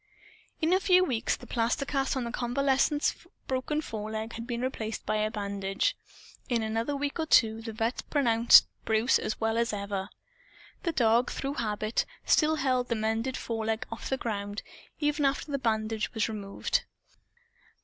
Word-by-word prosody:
In 320 +3 +3
a 375 - +4
few 365 -1 +5
weeks, 250 -10 0
the - - -13
plaster 240 +4 0
cast 275 -1 0
on 260 - -1
the 235 - -4
convalescent's 270 +4 +1 0.3
broken 265 +3 -1
foreleg 220 -2 -5
had 230 +1 -6
been 240 -1 -3
replaced 225 -4 -3
by 215 - 0
a 215 0 +1
bandage. 200 -1 -1 0.5
In 235 -3 +1
another 225 +6 -1
week 285 +3 -3
or 320 - -1
two 225 -5 +4
the 225 0 -5
vet' 225 +3 -1
pronounced 235 -5 +6 0.2
Bruce 220 +3 +3
as 215 - -3
well 225 +1 +1
as 235 0 +1
ever. 200 -1 -3 0.7
The 345 - 0
dog, 235 -4 +3
through 275 +1 -3
habit, 215 -3 -1 0.2
still 315 0 +4
held 255 -4 +1
the 235 - 0
mended 225 +4 -1
foreleg 225 -1 -2
off 225 - -6
the 265 - 0
ground, 205 -3 -4 0.4
even 295 0 +1
after 280 +2 0
the 280 - 0
bandage 220 -2 -1
was 220 - +1
removed. 205 -3 -2
230 Hz, 165 wpm, -29 LUFS, 220-270 Hz, 0.7 s, pronounced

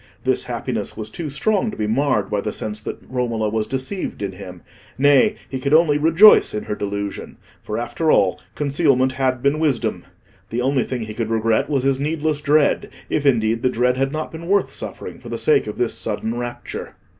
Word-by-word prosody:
This - - +1
happiness - - -4
was 110 0 -5
too 160 +3 -5
strong 205 - +1
to - - -8
be 105 - -1
marred 130 +5 +1
by 105 -1 0
the 105 - -3
sense 105 0 -4
that 110 - -6
Romola 115 -4 -1
was 110 0 -1
deceived 130 - -2
in 100 - -2
him; 90 -2 -10 0.3
nay, 140 0 +4
he 130 0 -4
could 140 +3 +2
only 155 -3 +4
rejoice 165 - +6
in 105 - -3
her - - -3
delusion; 100 -1 -5 0.2
for, 105 - -4
after 120 +7 -1
all, 95 -9 +3
concealment 140 -3 +2
had 130 -2 -1
been 140 +2 +2
wisdom. 145 -7 0 0.4
The 120 +2 -2
only 130 0 +1
thing 125 -3 -3
he 110 0 -6
could 110 0 -3
regret 115 +2 +1
was 140 -4 0
his 135 -1 +1
needless 150 0 -1
dread; 150 0 +2 0.2
if, 145 -1 +1
indeed, 115 -3 +2
the 130 - +2
dread 125 +1 +1
had 135 +1 0
not 155 +1 -4
been 165 +1 -8
worth 200 +1 +2
suffering - - -7
for - - -10
the - - -3
sake 450 -2 +2
of - - -5
this 120 - 0
sudden 110 +1 -3
rapture. 120 0 -6
130 Hz, 200 wpm, -21 LUFS, 110-150 Hz, 0.4 s, rejoice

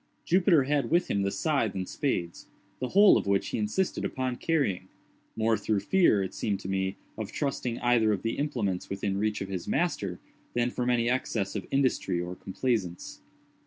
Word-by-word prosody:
Jupiter 175 -4 +4
had 140 +1 0
with 175 +2 +2
him 100 - +1
the 100 - +1
scythe 140 -2 0
and 95 -1 -3
spades—the 125 +1 -4
whole 200 +7 +6
of - - -5
which 100 0 +1
he - - -2
insisted 110 - -1
upon 130 -1 -2
carrying—more 110 - -2
through 105 -3 0
fear, 110 - +3
it 95 - -5
seemed 100 -3 -2
to - - -7
me, 95 0 -1 0.2
of 110 - -4
trusting 125 -5 -2
either 120 -3 +3
of 100 -3 -1
the 115 +3 -2
implements 115 -11 -2
within 100 0 -2
reach 105 0 -1
of 100 - -4
his 95 -3 -4
master, 100 - -1 0.4
than 120 0 +1
from 125 0 -1
any 120 -1 +2
excess 115 -5 -1
of 100 - -4
industry 130 -9 +1
or 90 +1 -4
complaisance. 95 -3 -3
110 Hz, 175 wpm, -28 LUFS, 95-135 Hz, 0.4 s, whole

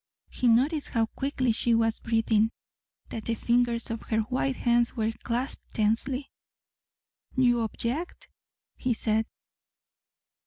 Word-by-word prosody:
He 250 - 0
noticed 275 +7 +3
how 225 -1 +2
quickly 260 0 -1
she 230 +1 +2
was 225 -1 +1
breathing 225 -1 +2 0.6
that 220 - -6
the 230 - 0
fingers 235 0 +1
of 230 - -4
her 220 0 +2
white 255 +3 -1
hands 240 -1 +2
were 220 0 +1
clasped 245 +3 -3
tensely. 245 +6 0 1.0
"You 245 -2 +4
object," 235 - -3 0.5
he 250 -2 0
said. 220 0 0
235 Hz, 120 wpm, -28 LUFS, 225-255 Hz, 1.0 s, You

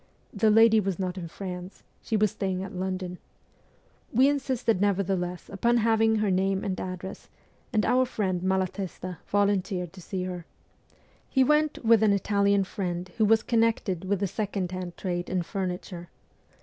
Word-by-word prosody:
The 215 +1 +3
lady 225 +1 +6
was 195 -4 -1
not 185 -2 -2
in 180 -3 -5
France; 180 +1 -7 0.2
she 220 - -1
was 210 -2 +2
staying 190 -1 -2
at 200 - -7
London. 185 -1 -4 0.9
We 255 +4 +5
insisted 260 -7 0
nevertheless 190 -3 0
upon 235 +5 +1
having 225 -1 +3
her 215 -2 +1
name 190 +1 +1
and 190 -3 -2
address, 185 +1 -7 0.4
and 215 -4 +2
our 255 +1 +3
friend 190 -7 -1
Malatesta 185 -1 -2
volunteered 195 -3 0
to 190 - -11
see 185 +2 -4
her. 180 -2 -6 0.8
He 265 - +4
went 300 -1 +1
with 225 -1 +6
an 215 -2 +4
Italian 200 0 +2
friend 180 -2 -4
who 220 - +5
was 220 +1 +4
connected 225 -6 +1
with 195 +1 -1
the 200 - +1
second 195 -2 -3
hand 180 -2 -6
trade 175 -2 -3
in 185 -2 0
furniture. 180 -1 -5
195 Hz, 160 wpm, -27 LUFS, 185-215 Hz, 0.9 s, lady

